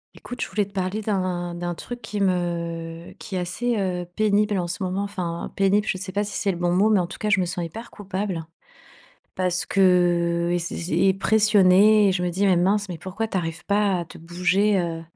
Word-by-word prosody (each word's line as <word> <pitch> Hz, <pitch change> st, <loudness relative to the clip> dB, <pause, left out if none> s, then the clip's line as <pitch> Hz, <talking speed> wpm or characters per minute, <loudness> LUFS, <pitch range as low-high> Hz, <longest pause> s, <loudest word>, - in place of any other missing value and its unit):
Écoute, 245 Hz, -, -8 dB
je -, -, -4 dB
voulais 205 Hz, -1 st, 0 dB
te 200 Hz, -, -17 dB
parler 190 Hz, +3 st, -2 dB
d'un 185 Hz, -4 st, -2 dB
d'un 175 Hz, 0 st, -3 dB
truc 245 Hz, +8 st, -8 dB
qui 210 Hz, -1 st, -4 dB
me 170 Hz, -2 st, -2 dB
qui -, -, -10 dB
est -, -, 0 dB
assez, 230 Hz, +7 st, -2 dB
heu, 180 Hz, -2 st, -2 dB
pénible 210 Hz, -1 st, +2 dB
en 175 Hz, -, -2 dB
ce 175 Hz, +2 st, -4 dB
moment. 185 Hz, +2 st, -1 dB
Enfin, 180 Hz, -4 st, -4 dB
pénible, 200 Hz, +2 st, +2 dB
je 190 Hz, -, 0 dB
sais 185 Hz, 0 st, -6 dB
pas 205 Hz, +2 st, 0 dB
si 210 Hz, -, -5 dB
c'est 200 Hz, -3 st, 0 dB
le 175 Hz, -, -5 dB
bon 175 Hz, 0 st, 0 dB
mot, 200 Hz, +5 st, +3 dB
mais 210 Hz, -, +4 dB
en 175 Hz, -, -1 dB
tout -, -, -9 dB
cas 215 Hz, -, -2 dB
je 210 Hz, -2 st, +4 dB
me 185 Hz, -, +1 dB
sens 175 Hz, 0 st, -3 dB
hyper 225 Hz, +9 st, -8 dB
coupable. 190 Hz, -4 st, -4 dB, 0.9 s
Parce 180 Hz, -1 st, -1 dB
que 175 Hz, -2 st, +2 dB
et 175 Hz, -, +1 dB
c'est 170 Hz, -, -5 dB
c'est 175 Hz, +2 st, -2 dB
et 195 Hz, -1 st, +4 dB
pressionnée 205 Hz, 0 st, +5 dB
et -, -, +2 dB
je 180 Hz, -1 st, -1 dB
me 180 Hz, -, 0 dB
dis: 190 Hz, +4 st, 0 dB
«Mais 185 Hz, -3 st, +4 dB
mince, 200 Hz, +3 st, +1 dB
mais 170 Hz, -3 st, -6 dB
pourquoi 195 Hz, +6 st, -4 dB
t'arrives 175 Hz, -4 st, -4 dB
pas 200 Hz, -2 st, +2 dB
à -, -, -6 dB
te -, -, -13 dB
bouger» 180 Hz, +5 st, +1 dB
heu, 165 Hz, -2 st, -3 dB
185 Hz, 230 wpm, -24 LUFS, 175-205 Hz, 0.9 s, pressionnée